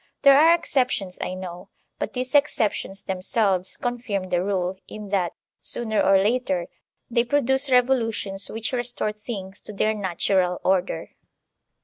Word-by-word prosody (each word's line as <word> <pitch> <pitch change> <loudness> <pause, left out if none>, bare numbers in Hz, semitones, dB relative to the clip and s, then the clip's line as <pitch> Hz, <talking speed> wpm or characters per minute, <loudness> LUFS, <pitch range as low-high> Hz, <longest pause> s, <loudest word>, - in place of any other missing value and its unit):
There 275 -1 +8
are 325 +4 +7
exceptions, 250 - -1
I 185 - -3
know; 180 -1 -8 0.3
but - - -3
these 255 0 -4
exceptions 225 -9 +1
themselves 190 0 0
confirm 240 -7 -3
the 175 0 +2
rule, 190 -1 -1
in 210 -1 -8
that, 185 -4 0 0.3
sooner 220 -3 0
or 195 0 +5
later, 195 -3 +1 0.5
they 235 0 +3
produce 265 +1 +2
revolutions 230 -6 +1
which 225 +3 -3
restore 240 -3 -1
things 210 -3 -7
to 215 - -8
their 215 +2 +1
natural 185 -2 0
order. 185 0 0
210 Hz, 135 wpm, -24 LUFS, 190-245 Hz, 0.5 s, There